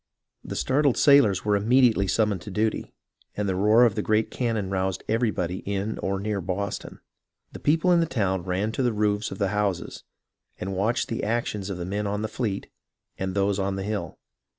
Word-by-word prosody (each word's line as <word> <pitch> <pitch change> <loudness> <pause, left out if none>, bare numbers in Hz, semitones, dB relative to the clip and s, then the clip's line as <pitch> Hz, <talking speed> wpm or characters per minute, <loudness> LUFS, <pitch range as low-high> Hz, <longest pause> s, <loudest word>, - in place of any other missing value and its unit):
The - - -6
startled 140 -1 +2
sailors 120 -11 +5
were 105 -1 +3
immediately 110 -1 +3
summoned 105 -3 +1
to 95 - -8
duty, 110 +2 -1 0.5
and 105 -1 -1
the 95 - +1
roar 105 +5 +5
of 115 - +2
the 110 - -1
great 110 +1 +1
cannon 110 -6 -1
roused 95 -1 -1
everybody 105 -6 0
in 100 +2 -3
or 95 0 -1
near 100 0 -2
Boston. 95 +2 -4 0.5
The - - -9
people 165 +5 +2
in 175 - +5
the 165 - +2
town 95 - 0
ran 95 +4 -1
to 125 - -2
the 120 -3 +1
roofs 105 0 0
of 95 - -7
the 100 -1 0
houses, 100 -3 -2 0.6
and 95 +1 -4
watched 110 +6 0
the 115 - -3
actions 105 -3 -2
of 95 - -4
the 85 - -4
men 100 +3 -2
on 105 +1 -2
the - - 0
fleet 110 -4 -3 0.5
and 95 0 -3
those 100 0 +1
on 95 0 -1
the 95 - -3
hill. 100 -5 -4
105 Hz, 195 wpm, -25 LUFS, 95-110 Hz, 0.6 s, sailors